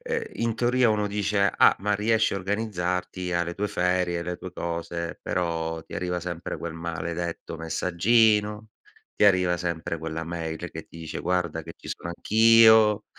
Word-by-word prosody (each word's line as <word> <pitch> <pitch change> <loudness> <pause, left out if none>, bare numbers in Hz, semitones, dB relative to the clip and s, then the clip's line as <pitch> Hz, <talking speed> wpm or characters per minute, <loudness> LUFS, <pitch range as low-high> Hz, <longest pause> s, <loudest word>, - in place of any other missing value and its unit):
ehm, 475 -2 -2
in 115 -1 -1
teoria 125 0 +3
uno 105 -1 +1
dice: 100 -1 +1
"Ah - - +5
ma 105 +1 +1
riesci 110 +2 +2
a - - -1
organizzarti 90 -3 -2
hai 85 0 +1
le 85 - -5
tue 105 +3 -2
ferie, 90 -2 0
hai 85 - -4
le 90 0 -4
tue 90 - -8
cose". 85 0 -4
Però 80 -2 -2
ti - - -15
arriva 90 -1 -2
sempre 85 -1 -5
quel 85 -1 -5
maledetto 85 0 -5
messaggino, 105 +6 +2 0.5
ti - - +2
arriva 90 -3 +3
sempre 85 -2 -3
quella 80 +1 -4
mail 80 -1 -4
che - - -8
ti - - -15
dice: 80 - -6
"Guarda 85 -3 -1
che - - -10
ci - - -12
sono - - -9
anch'io, 110 +2 +5
90 Hz, 175 wpm, -26 LUFS, 85-105 Hz, 0.5 s, Ah